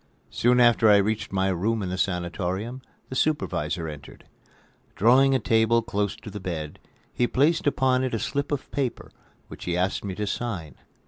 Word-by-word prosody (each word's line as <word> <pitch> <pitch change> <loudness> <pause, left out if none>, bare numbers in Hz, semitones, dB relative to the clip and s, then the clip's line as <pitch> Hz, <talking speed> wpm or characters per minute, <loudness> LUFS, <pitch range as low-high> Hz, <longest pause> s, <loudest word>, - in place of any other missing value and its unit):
Soon 125 +1 +3
after 120 -2 +5
I 105 - +7
reached 105 +2 -1
my 95 0 +1
room 105 +4 0
in 90 - -3
the 90 - -2
sanatorium, 95 +7 -2 0.3
the 130 - -6
supervisor 85 - -1
entered. 75 -3 -10 0.7
Drawing 130 +6 +5
a - - +2
table 115 +1 +2
close 105 -3 -2
to 105 - -11
the 105 - -6
bed, 80 -5 -5 0.3
he 120 - +1
placed 150 +6 +2
upon 130 -2 +2
it 130 -3 -1
a - - -2
slip 140 +6 -2
of 145 -2 -3
paper 135 -4 -3 0.4
which - - -10
he 90 -1 -1
asked 95 +1 0
me 95 -2 -4
to 105 - -2
sign. 95 - -4
110 Hz, 180 wpm, -25 LUFS, 90-125 Hz, 0.7 s, I